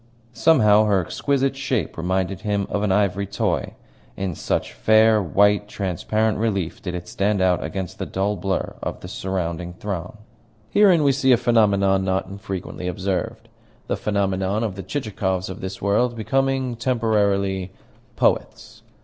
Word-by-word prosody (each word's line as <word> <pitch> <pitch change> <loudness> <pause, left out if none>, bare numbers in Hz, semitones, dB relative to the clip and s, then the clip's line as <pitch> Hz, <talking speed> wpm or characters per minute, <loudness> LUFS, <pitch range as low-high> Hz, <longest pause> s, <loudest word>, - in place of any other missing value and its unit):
Somehow 110 -10 +5
her 100 -2 +3
exquisite 135 - 0
shape 135 -4 -2
reminded 95 +2 -1
him 105 -2 -1
of 100 - 0
an 105 -2 +1
ivory 100 0 +1
toy, 100 +1 -2 0.4
in 95 -2 -2
such - - -2
fair, 110 0 +4
white, 100 +3 +3
transparent 105 +3 -1
relief 100 -7 -1
did 90 -2 -4
it 90 0 -6
stand 100 +1 0
out 90 -1 +2
against 95 -4 -5
the - - -3
dull 100 +2 -1
blur 95 +1 -2
of - - -5
the - - -8
surrounding 90 -2 -3
throng. 90 0 -5 0.5
Herein 185 - +5
we 140 - +5
see 130 -1 +3
a - - +5
phenomenon 100 -5 +3
not 95 0 0
infrequently 95 -2 -6
observed 95 +1 -3 0.4
the - - -1
phenomenon 100 0 -1
of 110 -4 -2
the 95 - -7
Chichikovs 95 -4 -2
of 95 - -9
this 95 0 -6
world 120 +4 +2
becoming 135 +2 0
temporarily 100 -6 0 0.4
poets. - - -1
100 Hz, 150 wpm, -22 LUFS, 95-110 Hz, 0.5 s, Somehow